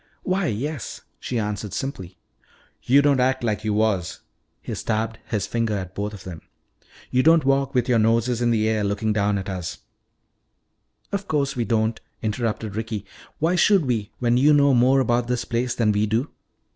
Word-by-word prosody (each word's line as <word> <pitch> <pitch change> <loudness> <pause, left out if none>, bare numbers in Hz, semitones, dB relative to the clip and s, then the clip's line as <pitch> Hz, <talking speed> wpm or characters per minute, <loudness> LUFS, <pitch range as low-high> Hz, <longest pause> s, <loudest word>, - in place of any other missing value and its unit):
"Why, 185 -1 0
yes," 135 +3 -4 0.2
she 125 - -3
answered 105 -2 -3
simply. 95 -6 -5 0.6
"Yo' 140 +3 +4
don' 140 -2 +3
act 130 0 +1
like 110 -2 -1
yo' 110 -1 0
was." 105 -5 0 0.4
He - - -6
stabbed 110 0 -2
his 105 -5 -1
finger 115 -2 -1
at 95 -1 -6
both 105 +2 -3
of 100 -3 -10
them. 85 -4 -8 0.7
"Yo' 130 - +3
don't 160 0 +5
walk 135 0 +1
with 125 -2 +3
youah 120 -3 +3
noses 115 +2 +2
in 120 - +2
the 110 -2 +2
air 110 -1 +1
looking 105 +2 0
down 100 -1 +1
at 95 - -5
us 90 -3 -4 0.7
" - - -46
"Of 200 0 -2
course 140 -3 0
we 120 -2 -1
don't!" 110 +1 0 0.2
interrupted 110 -2 -2
Ricky. 110 -2 -4 0.3
"Why 165 +3 +1
should 185 -1 +4
we, 115 -5 -1
when 120 -1 +2
you 145 +4 +5
know 140 -1 +5
more 130 +2 +4
about 120 -1 +1
this 125 -1 -1
place 120 +1 -1
than 110 -3 +2
we 105 +1 +1
do?" 115 +7 -1
115 Hz, 185 wpm, -23 LUFS, 105-130 Hz, 0.7 s, don't